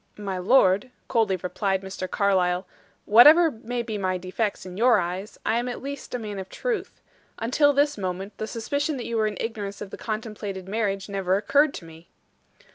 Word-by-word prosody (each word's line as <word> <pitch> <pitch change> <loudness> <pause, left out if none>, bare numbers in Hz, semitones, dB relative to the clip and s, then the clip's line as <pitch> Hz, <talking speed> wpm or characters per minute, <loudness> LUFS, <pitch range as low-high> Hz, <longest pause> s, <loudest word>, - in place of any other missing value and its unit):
"My 195 -3 -4
lord," 195 +1 +4 0.2
coldly 225 -6 +2
replied 190 +2 -2
Mr. 190 -1 -5
Carlyle, 185 -2 +1 0.4
"whatever 305 +10 +8
may 235 +1 -4
be 220 -3 -4
my 185 -1 0
defects 185 +3 -3
in 180 -1 -8
your 235 +4 +5
eyes, 180 +4 -4
I 225 +2 +2
am 245 +1 -2
at 245 - -5
least 280 -1 -6
a - - 0
man 210 -4 -6
of 190 - -7
truth. - - -3 0.4
Until 275 +6 +3
this 285 -3 +1
moment, 190 +2 -4
the 220 - -3
suspicion 285 +6 -2
that 245 - -5
you 235 - -3
were 220 -1 +2
in 210 -3 -4
ignorance 205 -3 -4
of 200 -2 -7
the - - -7
contemplated 215 -4 -5
marriage 195 -2 -1
never 195 -2 0
occurred 285 +7 +3
to 170 - -8
me." 165 +1 -14
210 Hz, 190 wpm, -25 LUFS, 190-240 Hz, 0.4 s, whatever